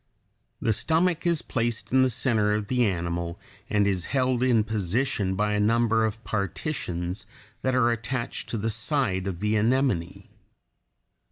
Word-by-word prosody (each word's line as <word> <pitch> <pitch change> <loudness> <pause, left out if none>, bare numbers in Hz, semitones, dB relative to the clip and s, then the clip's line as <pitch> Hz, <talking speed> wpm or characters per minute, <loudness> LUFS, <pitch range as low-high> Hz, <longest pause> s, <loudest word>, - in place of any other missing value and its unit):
The 115 - +1
stomach 165 - +1
is 170 -3 +1
placed 115 -3 -2
in 130 +1 +5
the 130 - +4
center 110 -4 +1
of 105 0 -3
the 125 -1 +2
animal, 85 -2 -2 0.3
and 105 -1 +3
is 95 -3 0
held 130 -2 +1
in 120 -4 +4
position 105 -1 -1
by 105 +2 +1
a 105 - +1
number 115 +1 +3
of 110 +1 -4
partitions 100 - -3 0.3
that 130 0 +1
are 120 -2 +4
attached 120 +1 -3
to 115 - -2
the 110 +2 -1
side 115 -5 0
of 90 -2 -4
the 105 +1 +1
anemone. 110 -6 0
110 Hz, 155 wpm, -26 LUFS, 100-125 Hz, 0.3 s, in